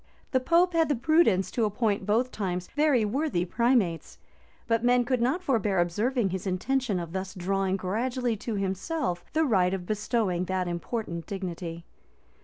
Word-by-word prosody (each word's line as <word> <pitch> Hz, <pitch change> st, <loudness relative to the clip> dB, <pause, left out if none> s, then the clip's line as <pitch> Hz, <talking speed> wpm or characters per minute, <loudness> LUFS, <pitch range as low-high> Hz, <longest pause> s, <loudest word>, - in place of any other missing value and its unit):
The 260 Hz, -, +3 dB
pope 340 Hz, +7 st, +3 dB
had 325 Hz, -2 st, +3 dB
the 290 Hz, -, +2 dB
prudence 245 Hz, -, +3 dB
to 235 Hz, -, 0 dB
appoint 210 Hz, -1 st, 0 dB
both 235 Hz, +5 st, +2 dB
times 180 Hz, -3 st, -3 dB
very 295 Hz, -7 st, +3 dB
worthy 235 Hz, -, 0 dB
primates; 225 Hz, -5 st, +1 dB, 0.5 s
but 230 Hz, -1 st, +1 dB
men 245 Hz, 0 st, +4 dB
could 250 Hz, -1 st, 0 dB
not 275 Hz, +10 st, +1 dB
forbear 220 Hz, -, +1 dB
observing 210 Hz, +6 st, +1 dB
his 190 Hz, +1 st, -4 dB
intention 210 Hz, +2 st, 0 dB
of 170 Hz, -1 st, -6 dB
thus 190 Hz, +1 st, -4 dB
drawing 190 Hz, +1 st, 0 dB
gradually 235 Hz, +6 st, -1 dB
to 220 Hz, +2 st, -4 dB
himself 195 Hz, -, -2 dB
the 320 Hz, +1 st, +3 dB
right 190 Hz, -7 st, +2 dB
of 180 Hz, -2 st, -6 dB
bestowing 210 Hz, -3 st, 0 dB
that 185 Hz, -1 st, -1 dB
important 175 Hz, 0 st, -4 dB
dignity. 175 Hz, -4 st, -5 dB
210 Hz, 160 wpm, -27 LUFS, 185-255 Hz, 0.5 s, men